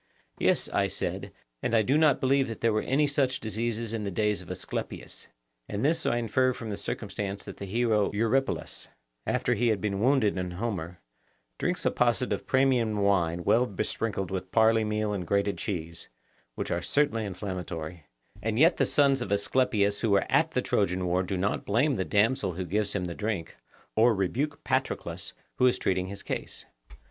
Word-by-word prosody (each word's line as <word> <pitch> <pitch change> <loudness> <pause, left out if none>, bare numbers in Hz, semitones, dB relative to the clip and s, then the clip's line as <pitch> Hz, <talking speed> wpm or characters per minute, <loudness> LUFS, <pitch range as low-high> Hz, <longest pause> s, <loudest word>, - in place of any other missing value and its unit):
Yes, - - +2
I - - +1
said, - - -3 0.3
and 115 - 0
I 110 - +5
do 135 +7 +2
not 155 -3 +4
believe 135 +1 +2
that 115 - -7
there 115 -1 +3
were 110 - +1
any 145 +3 +2
such 140 -3 +1
diseases 115 +1 -2
in 110 -2 -2
the 100 - -2
days 105 +2 0
of - - -13
Asclepius; - - -5 0.4
and 105 +5 -2
this 165 +2 +2
I 120 - +2
infer 130 +3 +2
from 115 -2 -6
the - - -2
circumstance 100 -1 -4
that - - -8
the 100 - -6
hero 110 0 +2
Eurypylus, 115 +6 -1 0.4
after 125 - +1
he 120 +1 +1
has 110 -2 +3
been 100 0 -2
wounded 115 -5 +3
in 90 0 -2
Homer, 90 -4 -4 0.6
drinks - - -1
a - - +3
posset - - +1
of - - -5
Pramnian 125 -5 +2
wine 90 -4 +2
well 120 +6 +3
besprinkled 100 -1 -2
with 95 -1 -3
barley 110 0 +4
meal 105 0 -1
and 90 -4 -4
grated 100 -2 +1
cheese, 85 -5 -5 0.5
which - - -4
are - - 0
certainly 140 -6 +1
inflammatory, 90 -5 -5 0.3
and 110 0 -1
yet 165 +6 +5
the - - +2
sons 140 -3 +3
of 120 - -4
Asclepius 100 -1 +2
who 115 - +1
were 100 -1 +3
at - - +4
the - - -1
Trojan 90 +1 +1
war 90 +1 +1
do 95 +1 -2
not 100 +3 -1
blame 130 +8 +2
the 95 - 0
damsel 105 -2 +2
who 90 +2 -4
gives 100 +3 0
him 95 -3 -1
the 85 - -4
drink, 105 -4 -3 0.4
or 115 +1 +5
rebuke 125 +10 -1
Patroclus, - - -2 0.2
who 125 - +5
is 125 - +3
treating 95 -1 0
his 100 +1 -6
case. - - -4
105 Hz, 190 wpm, -28 LUFS, 95-120 Hz, 0.6 s, I